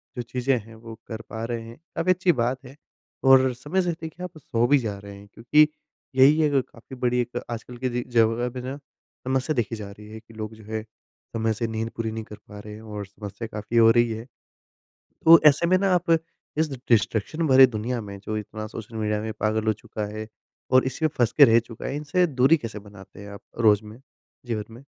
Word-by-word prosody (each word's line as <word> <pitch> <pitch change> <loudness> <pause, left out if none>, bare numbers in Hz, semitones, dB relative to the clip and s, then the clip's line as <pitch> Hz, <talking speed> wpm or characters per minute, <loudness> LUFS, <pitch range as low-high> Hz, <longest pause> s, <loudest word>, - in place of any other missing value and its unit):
जो 125 - -3
चीज़ें 125 +2 0
हैं, 115 0 -10
वो 115 0 -10
कर 110 -1 -6
पा 110 0 -5
रहे 115 -1 -3
हैं, 115 +1 -11 0.2
काफ़ी 170 +2 +2
अच्छी 185 0 +3
बात 125 0 -1
है। 130 +2 -12 0.5
और 130 -1 +6
समय 145 +10 -1
से 175 -1 0
देखिए 165 +2 -7
आप 175 -3 -7
सो 120 -5 0
भी 145 - +5
जा 105 -4 -4
रहे 100 0 -10
हैं, 100 +1 -14
क्योंकि 150 +6 +4 0.5
यही 140 +4 +6
है 150 - +3
क 135 - +4
काफ़ी 120 +3 -12
बड़ी 125 -1 0
एक 120 0 -4
आजकल 120 +1 -7
की 130 +1 -2
जे 120 0 -2
जगह 115 +2 +3
में 125 - -4
ना 130 +2 -5 0.5
समस्या 130 +3 0
देखी 115 -1 -1
जा 105 -2 -7
रही 105 +1 -13
है, 110 +1 -9
कि 115 - -19
लोग 110 0 -6
जो 110 - -15
है 110 0 -4
समय 110 0 -5
से 115 +2 -2
नींद 110 0 -3
पूरी 110 -1 -2
नहीं 110 0 -5
कर 105 - -11
पा 105 - -9
रहे 105 0 -9
हैं 110 - -10
और 105 -2 -6
समस्या 100 +3 -8
काफ़ी 110 +2 -3
हो 115 -1 +7
रही 120 0 +3
है। 110 +1 -5 1.0
तो 165 0 +10
ऐसे 150 +4 +4
में 185 - +4
ना 195 -1 +2
आप 175 -1 0 0.5
इस 160 0 +1 0.2
डिस्ट्रक्शन 115 +8 +1
भरे 130 -1 +8
दुनिया 120 +2 -3
में 100 -2 -8
जो 110 0 -3
इतना 110 +1 -6
सोशल 115 +1 -9
मीडिया 105 -1 0
में 110 0 -4
पागल 110 +1 0
हो 110 - +4
चुका 105 +1 -6
है 110 0 -5 0.4
और 130 0 +6
इसी 135 +5 -2
में - - +3
फँस 120 -1 +3
के 145 - +9
रह 115 -2 +5
चुका 115 -1 -10
है, 135 - -3
इनसे 150 +5 +1
दूरी 135 +2 +4
कैसे 115 -6 -7
बनाते 100 -2 -14
हैं? 100 - -9
आप 100 - -10 0.2
रोज़ 110 -2 +4
में, 105 +3 -12 0.5
जीवन 110 -3 -3
में? 120 - -13
115 Hz, 230 wpm, -25 LUFS, 110-130 Hz, 1.0 s, तो